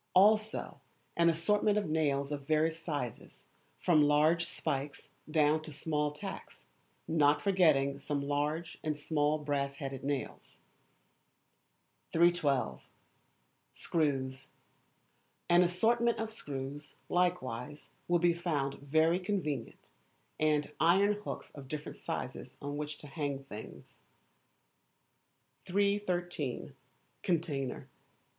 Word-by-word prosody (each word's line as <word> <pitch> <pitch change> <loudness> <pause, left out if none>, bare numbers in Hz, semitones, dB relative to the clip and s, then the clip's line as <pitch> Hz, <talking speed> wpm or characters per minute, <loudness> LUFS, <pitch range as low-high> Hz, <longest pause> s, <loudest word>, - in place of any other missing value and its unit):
Also 215 +3 +3 0.3
an 170 0 +5
assortment 205 +5 +2
of 205 -4 0
nails 145 -3 +1
of 140 -2 -5
various 160 +1 +2
sizes, 145 -8 -5 0.3
from 160 -4 +4
large 155 +3 +4
spikes 145 -3 -3 0.2
down 155 0 +3
to 155 - -9
small 150 0 -1
tacks, 150 0 -8 0.4
not 145 -2 +4
forgetting 145 -7 +3
some 145 0 -2
large 145 +4 -2
and 155 -2 -1
small 150 0 +1
brass 140 -2 -1
headed 135 -2 -5
nails. 140 -1 -4 1.6
312. 150 - +2 0.9
Screws. 135 -4 -1 1.0
An 175 +1 +6
assortment 230 +7 +3
of 225 0 -3
screws, 145 -6 -6
likewise, 150 -7 -1 0.2
will 175 - +4
be 175 0 +3
found 155 -6 -2
very 160 +5 +3
convenient, 180 - -3 0.5
and 150 -1 +2
iron 195 +5 +5
hooks 210 0 -6
of 140 -2 -10
different 150 +1 -5
sizes - - -5
on 145 +1 -4
which 150 0 -4
to - - -11
hang 140 -2 -3
things. 110 -5 -10 1.7
313. 180 -7 -1 0.5
Container. 150 -7 -1
150 Hz, 105 wpm, -32 LUFS, 140-175 Hz, 1.7 s, An